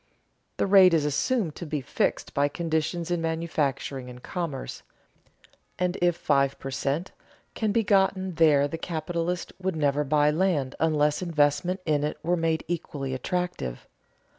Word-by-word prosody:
The -, -, +1 dB
rate 190 Hz, -3 st, +7 dB
is 155 Hz, -2 st, +2 dB
assumed 165 Hz, -, 0 dB
to 175 Hz, -, -6 dB
be 150 Hz, 0 st, -2 dB
fixed 135 Hz, -, -1 dB
by 140 Hz, +1 st, +2 dB
conditions 165 Hz, +2 st, -2 dB
in 175 Hz, -1 st, 0 dB
manufacturing 150 Hz, -5 st, -2 dB
and 125 Hz, 0 st, -11 dB
commerce, 165 Hz, -7 st, -4 dB, 1.0 s
and 180 Hz, 0 st, 0 dB
if 175 Hz, -1 st, +3 dB
five 140 Hz, -4 st, +1 dB
per 135 Hz, -, -6 dB
cent, 140 Hz, +6 st, -2 dB, 0.4 s
can 220 Hz, -2 st, 0 dB
be 225 Hz, +2 st, +2 dB
gotten 190 Hz, -2 st, +2 dB
there 150 Hz, -3 st, +4 dB
the 165 Hz, +3 st, -6 dB
capitalist 170 Hz, +1 st, -3 dB
would 190 Hz, -2 st, -1 dB
never 145 Hz, -1 st, +1 dB
buy 150 Hz, +1 st, +3 dB
land 155 Hz, -6 st, +1 dB
unless 150 Hz, -1 st, +2 dB
investment 170 Hz, +2 st, +1 dB
in 150 Hz, -2 st, +1 dB
it 150 Hz, -, -2 dB
were 175 Hz, +2 st, +2 dB
made 165 Hz, -2 st, 0 dB
equally 145 Hz, -5 st, -3 dB
attractive. 130 Hz, -, -3 dB
160 Hz, 150 wpm, -26 LUFS, 145-175 Hz, 1.0 s, rate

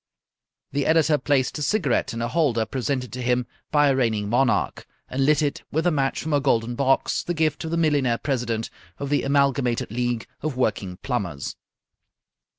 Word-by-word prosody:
The 140 Hz, 0 st, 0 dB
editor 160 Hz, -2 st, +4 dB
placed 135 Hz, +1 st, +1 dB
a -, -, -5 dB
cigarette 150 Hz, -, +1 dB
in 115 Hz, 0 st, -3 dB
a -, -, 0 dB
holder 125 Hz, -6 st, +1 dB
presented 130 Hz, -1 st, -3 dB
to 125 Hz, -, -4 dB
him 125 Hz, 0 st, +1 dB, 0.2 s
by 145 Hz, -1 st, +4 dB
a 135 Hz, -, +3 dB
reigning 110 Hz, -5 st, 0 dB
monarch, 125 Hz, +2 st, +1 dB, 0.2 s
and 135 Hz, +1 st, 0 dB
lit 150 Hz, 0 st, +4 dB
it 145 Hz, -, -1 dB
with 160 Hz, +3 st, 0 dB
a 175 Hz, -, +4 dB
match 135 Hz, -3 st, 0 dB
from 155 Hz, 0 st, -2 dB
a 145 Hz, -, +4 dB
golden 120 Hz, -4 st, +1 dB
box, 135 Hz, +1 st, +1 dB
the 175 Hz, -, -3 dB
gift 160 Hz, 0 st, 0 dB
of -, -, -3 dB
the 170 Hz, -, -1 dB
millionaire 145 Hz, -7 st, +2 dB
president 120 Hz, -5 st, -2 dB, 0.3 s
of 140 Hz, -, -4 dB
the 145 Hz, -, +3 dB
Amalgamated 135 Hz, -5 st, +1 dB
League 120 Hz, 0 st, -1 dB, 0.2 s
of 150 Hz, -4 st, -3 dB
Working 100 Hz, -7 st, -1 dB
Plumbers. 95 Hz, -, -3 dB
135 Hz, 180 wpm, -24 LUFS, 120-145 Hz, 0.3 s, editor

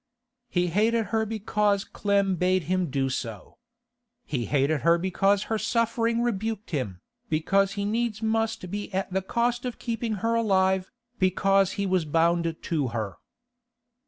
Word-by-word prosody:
He 180 Hz, -4 st, +1 dB
hated 220 Hz, +5 st, +2 dB
her 220 Hz, 0 st, +1 dB
because 210 Hz, -2 st, 0 dB
Clem 200 Hz, -3 st, +1 dB
bade 185 Hz, +1 st, +1 dB
him 180 Hz, +1 st, 0 dB
do 135 Hz, 0 st, 0 dB
so. 115 Hz, -6 st, -5 dB, 0.7 s
He 125 Hz, -5 st, -2 dB
hated 145 Hz, 0 st, +1 dB
her 170 Hz, 0 st, +4 dB
because 195 Hz, +3 st, +2 dB
her 220 Hz, -1 st, -2 dB
suffering 230 Hz, 0 st, +1 dB
rebuked 220 Hz, -2 st, -2 dB
him, 105 Hz, -, -3 dB, 0.3 s
because 195 Hz, +5 st, +2 dB
he 200 Hz, 0 st, -2 dB
must 225 Hz, 0 st, -1 dB, 0.4 s
needs -, -, -11 dB
be 205 Hz, 0 st, -4 dB
at 190 Hz, -1 st, -2 dB
the 190 Hz, -, +1 dB
cost 240 Hz, +5 st, 0 dB
of 250 Hz, -2 st, -4 dB
keeping 230 Hz, -1 st, -2 dB
her 230 Hz, -, +2 dB
alive, 190 Hz, -4 st, +2 dB, 0.3 s
because 195 Hz, +1 st, +3 dB
he 200 Hz, -, -2 dB
was 185 Hz, -3 st, +1 dB
bound 165 Hz, +1 st, +2 dB
to 150 Hz, -5 st, 0 dB
her. 110 Hz, -4 st, -4 dB
195 Hz, 150 wpm, -26 LUFS, 170-220 Hz, 0.7 s, her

